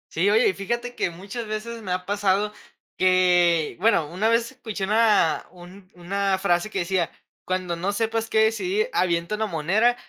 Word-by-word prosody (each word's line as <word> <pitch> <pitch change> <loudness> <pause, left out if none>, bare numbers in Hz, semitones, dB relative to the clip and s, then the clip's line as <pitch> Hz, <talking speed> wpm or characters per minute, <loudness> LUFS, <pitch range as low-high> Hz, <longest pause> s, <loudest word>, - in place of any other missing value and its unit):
Sí, 180 +5 +2
oye, 220 +4 +4
y - - -1
fíjate 235 +6 -4
que 190 - -1
muchas 200 +7 -7
veces 220 +2 -5
me 190 -4 -3
ha 180 0 -3
pasado 205 +1 +1 0.5
que 180 -3 +3
bueno, 185 -6 +3
una 185 +6 -1
vez 230 +2 +1
escuché 220 -6 -6
una, 210 -5 +3
un 185 +2 -14
una 195 +2 -1
frase 175 +2 0
que - - -3
decía: 175 -1 0 0.4
"Cuando 185 -2 -2
no 190 +4 -2
sepas 225 +1 -1
qué 220 - +2
decidir, 365 - 0
avienta 170 +2 0
una 220 +1 -1
moneda, 200 +8 +2
195 Hz, 175 wpm, -24 LUFS, 180-220 Hz, 0.5 s, oye